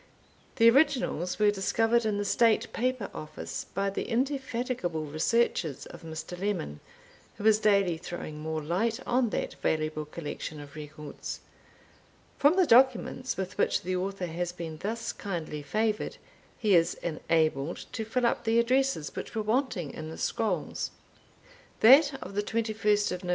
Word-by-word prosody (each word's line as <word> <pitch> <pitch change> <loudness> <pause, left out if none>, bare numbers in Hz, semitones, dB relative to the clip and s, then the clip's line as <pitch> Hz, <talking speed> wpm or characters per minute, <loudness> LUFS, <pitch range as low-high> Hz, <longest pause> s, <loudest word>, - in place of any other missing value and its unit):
The 230 -3 +6
originals 255 - +2
were 210 -1 +4
discovered 225 +4 +1
in 210 -1 0
the 205 - -1
State 230 +1 +3
Paper 255 -3 -1
Office, 155 - -6
by 195 +1 0
the - - -4
indefatigable 245 - -1
researches 155 - 0
of - - -11
Mr. 160 +2 -6
Lemon, 185 - -2 0.6
who 205 - -7
is 215 -1 +6
daily 200 -5 +3
throwing 160 -3 -6
more 155 0 -3
light 210 +9 0
on 245 -1 +2
that - - -2
valuable 155 -1 0
collection 150 0 -6
of 145 -1 -11
records. 150 -1 -7 1.0
From 290 +4 +5
the 375 -1 +5
documents 260 0 +3
with 190 +1 -4
which - - +2
the 185 +1 -1
Author 190 0 -2
has 175 +1 -3
been 165 -3 -7
thus 225 +5 -3
kindly 165 -6 -4
favoured, 215 +8 -1 0.4
he 210 -3 +2
is 170 -1 +4
enabled 155 -2 0
to 225 - -3
fill 240 +3 0
up 235 - +1
the 225 0 +2
addresses 255 - +1
which - - -6
were 220 - 0
wanting 215 - -1
in 155 0 -6
the 160 - -8
scrolls. - - -1 0.9
That 275 +5 +7
of - - -8
the 205 - +1
21st 210 -4 0
Nov. 180 - -5
200 Hz, 150 wpm, -29 LUFS, 160-230 Hz, 1.0 s, That